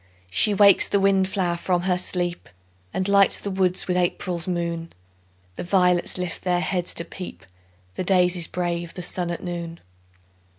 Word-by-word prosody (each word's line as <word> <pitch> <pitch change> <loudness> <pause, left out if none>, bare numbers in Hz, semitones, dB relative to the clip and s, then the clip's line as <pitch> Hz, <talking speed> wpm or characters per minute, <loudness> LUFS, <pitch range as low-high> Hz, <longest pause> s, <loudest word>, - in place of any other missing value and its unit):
She 210 - +2
wakes 200 -1 +6
the 200 - +1
wind 195 -1 +3
flower 185 -3 -1
from 175 0 -1
her 180 -1 +1
sleep, 175 -1 -2 0.4
And 185 - -2
lights 200 0 +4
the 200 - -4
woods 185 -1 +1
with 180 - 0
April's 175 -1 0
moon; 170 -2 -3 0.6
The - - -4
violets 180 -1 +2
lift 180 -2 -4
their 180 -1 0
heads 180 -1 -2
to 170 - -1
peep, 180 +2 -9 0.5
The - - -4
daisies 180 -2 +3
brave 175 -1 -3
the 180 - -5
sun 175 0 -2
at 170 - -5
noon. 170 -2 -5
180 Hz, 165 wpm, -23 LUFS, 175-190 Hz, 0.6 s, wakes